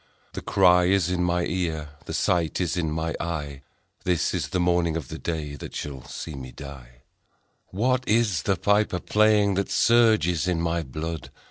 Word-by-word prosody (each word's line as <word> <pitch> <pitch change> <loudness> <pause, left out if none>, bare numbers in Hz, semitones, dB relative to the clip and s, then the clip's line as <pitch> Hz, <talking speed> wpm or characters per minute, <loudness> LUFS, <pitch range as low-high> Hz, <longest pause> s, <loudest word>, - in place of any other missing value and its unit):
The - - -5
cry 90 -2 +4
is 90 -1 +2
in 90 -1 0
my 90 0 +1
ear, 80 -4 -2 0.2
The - - -6
sight 85 -4 +1
is 90 -2 0
in 85 -3 -1
my 80 +1 -2
eye, 75 -5 -4 0.4
This 90 -3 +1
is - - -1
the 90 - -1
morning 85 -2 +2
of 80 - -6
the - - -6
day 80 -4 -3
That 70 - -8
shall 70 -3 -6
see 80 - -7
me 65 -2 -8
die: 65 -4 -11 0.6
What 125 +6 0
is 105 -6 +2
the 95 - +1
piper 105 -1 +1
playing 105 -1 +3
That 100 +1 -1
surges 110 -9 +3
in 90 -2 +1
my 85 0 0
blood 80 +3 -5
85 Hz, 175 wpm, -25 LUFS, 80-95 Hz, 0.6 s, cry